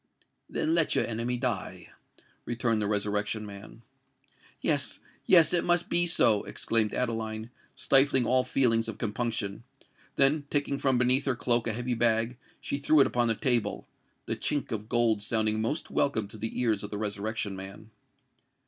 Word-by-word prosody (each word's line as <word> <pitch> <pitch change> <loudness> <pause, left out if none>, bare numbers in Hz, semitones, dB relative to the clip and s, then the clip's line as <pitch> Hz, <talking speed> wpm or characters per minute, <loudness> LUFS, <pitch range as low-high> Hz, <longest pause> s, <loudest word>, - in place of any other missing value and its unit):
"Then 160 - -1
let 165 -2 +2
your - - +2
enemy 120 +2 -2
die," 120 -3 -4 0.6
returned 115 -2 -1
the 105 - -1
Resurrection 105 +1 -1
Man. 105 +3 -11 0.8
"Yes—yes: 165 -3 +2
it 175 - +2
must 175 0 +1
be 175 0 +4
so!" 115 -11 +3
exclaimed 115 -2 0
Adeline, 115 -1 -3 0.2
stifling 135 -2 +4
all 130 +2 +3
feelings 115 -5 +1
of 115 - -6
compunction: 115 -2 -3 0.5
then 145 +1 +2
taking 140 -1 -1
from 130 -2 +1
beneath 125 +2 +3
her 135 -3 0
cloak 120 -1 +1
a 110 - -1
heavy 120 +2 -2
bag, 115 +1 +1 0.2
she 140 - -4
threw 150 +2 +3
it 135 - +6
upon 120 -1 0
the 115 - +1
table, 120 -3 -1 0.4
the - - -2
chink 145 -3 -2
of 110 -1 -5
gold 115 -3 +2
sounding 110 0 0
most 130 +9 -3
welcome 110 -7 0
to 110 - -8
the 110 +2 -4
ears 110 -5 +1
of 105 - -6
the 105 - -5
Resurrection 105 0 -3
Man. 95 +3 -10
115 Hz, 160 wpm, -28 LUFS, 110-130 Hz, 0.8 s, it